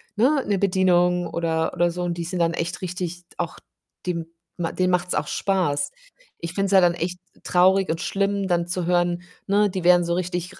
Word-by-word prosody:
ne, 265 +6 +3
'ne 200 -2 +1
Bedienung 180 -2 +2
oder 160 -1 -1
oder 175 -1 +2
so 180 +1 -4
und 175 -1 -1
die 170 - -3
sind 180 +1 -3
dann 170 0 +2
echt 170 +2 -3
richtig 180 -1 -4
auch 170 -2 -3 0.5
dem 170 -2 -2 0.3
denen 180 +1 0
macht's 180 0 0
auch 150 0 -1
Spaß. 145 -8 0 0.5
Ich 170 -1 -5
finde 195 +1 0
es - - -4
ja 195 - +7
dann 175 -1 +4
echt 175 +1 -4 0.2
traurig 190 +2 +3
und 160 - -1
schlimm 200 0 0
dann 175 -2 +1
zu 180 0 -2
hören 175 0 +1 0.2
ne, 205 +1 +3
die 185 -1 -4
werden 175 0 +5
so 170 - 0
richtig 180 +1 -3
180 Hz, 200 wpm, -23 LUFS, 170-185 Hz, 0.5 s, ja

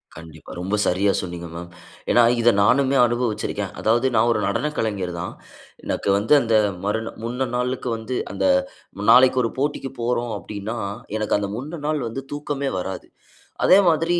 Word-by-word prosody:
கண்டிப்பா 80 -1 -12
ரொம்ப 95 +4 -1
சரியா 100 +3 +2
சொன்னீங்க 85 -1 -6
மேம். 85 +1 -7 0.4
ஏன்னா 120 - +5 0.2
இத 120 - +5
நானுமே 135 +5 +3
அனுபவிச்சிருக்கேன். 120 -2 -2
அதாவது 120 +4 +2
நான் 120 - +4
1 - - +1
நடன 150 - -1
கலைஞர் 100 -5 -2
தான். 90 - -5 0.5
எனக்கு - - -2
வந்து 105 +8 +2
1 - - +3
அந்த 115 -1 +2 0.3
மறுநா 110 +2 -2
முந்த 125 +3 -2
நாளுக்கு 125 0 -2
வந்து 115 +3 -5 0.2
அந்த - - -1 0.7
நாளைக்கு 130 +1 +6
1 115 - -1
போட்டிக்கு 140 -2 -2
போறோம் 120 0 -1
அப்டின்னா, 105 +4 -6 0.4
எனக்கு 105 -1 +1
அந்த 100 -1 -3
முன்ன 150 +6 -6
நாள் 155 -1 0
வந்து 135 +4 -5
தூக்கமே 145 -1 -3
வராது. 95 0 -6 0.6
அதே 185 - +7
மாதிரி 165 +2 +1
115 Hz, 160 wpm, -22 LUFS, 100-135 Hz, 0.7 s, அதே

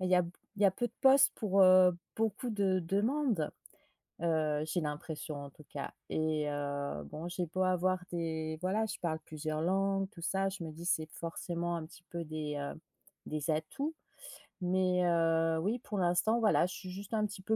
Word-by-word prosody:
bah 185 - 0
il - - -1
y 180 - +6
a 180 - +5 0.3
il 205 - -1
y - - +6
a 195 - +7
peu 240 +4 -1
de - - -30
postes 270 +1 +7
pour, 195 -3 +3
heu, 185 -1 +7 0.2
beaucoup 225 +2 0
de 195 -3 +2
demandes», 205 - +1 0.7
heu, 155 -2 +1
j'ai 170 +3 0
l'impression 150 0 -4
en 140 - -8
tout 150 +1 -16
cas. 140 -1 -5 0.2
Et 155 -1 0
heu, 140 - -3
bon, 155 - -6
j'ai 175 0 -2
beau 185 +4 0
avoir 185 0 +2
des 160 -2 -2
voilà, 205 +4 +1
je - - -4
parle 160 -3 -1
plusieurs 155 0 -3
langues, 195 +2 +1
tout 185 -5 -13
ça, 195 +3 +1
je 190 -2 -4
me 160 - -5
dis 165 +3 -9
c'est 160 -3 +1
forcément 170 +1 -3
un 165 -2 -4
petit 175 - -15
peu 170 -1 -4
des, 155 -1 -4
heu, 140 +2 -4 0.5
des 155 +1 -1
atouts. 160 - -2 0.7
Mais, 180 0 +2
heu, 165 -1 +3
oui 215 +8 0
pour 210 -3 -5
l'instant 180 +6 +3
voilà 210 -5 +4
je - - -7
suis 185 -1 -7
juste 200 +3 -5
un 215 - +2
petit 200 -2 -6
peu 220 +3 +1
175 Hz, 200 wpm, -33 LUFS, 155-195 Hz, 0.7 s, a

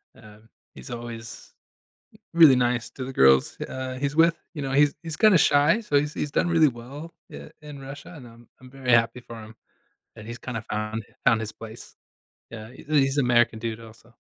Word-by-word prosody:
um, 110 +1 -17 0.2
he's - - -12
always 120 -1 -9 0.8
really 160 -6 +7
nice 120 -1 0
to 130 - -7
the 135 - -7
girls, 65 - +4
uh, 130 0 -5
he's 140 +1 -2
with, 165 +1 +4 0.2
you 150 - -6
know? 135 -1 -3
He's 145 +1 +3
he's 160 -2 -6
kinda 215 -5 +5
shy, 150 +10 +3
so 145 -9 +1
he's 150 +1 -3
he's 145 - -4
done - - +1
really 165 -2 +4
well, 135 +6 -8 0.2
eh, - - -10
in 150 -2 -10
Russia, 135 +5 -10
and 125 -5 -12
I'm 115 0 -17
I'm 130 - -15
very 130 -1 -3
happy 120 +1 +3
for 115 -2 -11
him, 110 +1 -13 0.6
and 105 - -11
he's 120 +1 -7
kinda 115 -2 -6
found 105 +1 -4 0.2
found 115 -2 +4
his 110 -1 -5
place. 115 +1 -12 0.5
Yeah, 110 0 -9
he's 130 - -15
a - - -6
he's 135 -1 +2
American 120 -3 +2
dude, 115 0 -5
also. 115 +1 -16
125 Hz, 195 wpm, -25 LUFS, 115-145 Hz, 0.8 s, really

